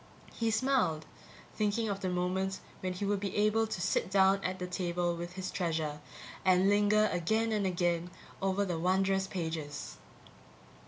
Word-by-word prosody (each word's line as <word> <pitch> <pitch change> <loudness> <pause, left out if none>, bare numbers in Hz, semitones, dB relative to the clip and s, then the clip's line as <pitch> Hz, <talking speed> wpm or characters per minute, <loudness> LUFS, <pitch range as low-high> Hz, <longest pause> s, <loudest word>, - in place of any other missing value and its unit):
He 230 -1 0
smiled, 220 - +1 0.5
thinking 215 +1 0
of 200 -2 -2
the 185 -1 -2
moment 185 +2 -1 0.2
when 185 -1 -2
he 180 +3 -3
would 200 0 +1
be 200 -1 -4
able 215 +2 +3
to 215 - -4
sit 180 - 0
down 195 0 +4
at 185 0 -2
the 180 - -4
table 175 -1 -1
with 175 +1 -6
his 185 0 -4
treasure, 160 -4 -2 0.4
and 185 0 +4
linger 210 +1 +4
again 220 +6 +1
and 210 -3 +1
again 175 -1 0 0.3
over 195 +1 +1
the 175 -4 -2
wonderous 190 +2 +2
pages. 160 -5 -4
190 Hz, 160 wpm, -32 LUFS, 175-205 Hz, 0.5 s, down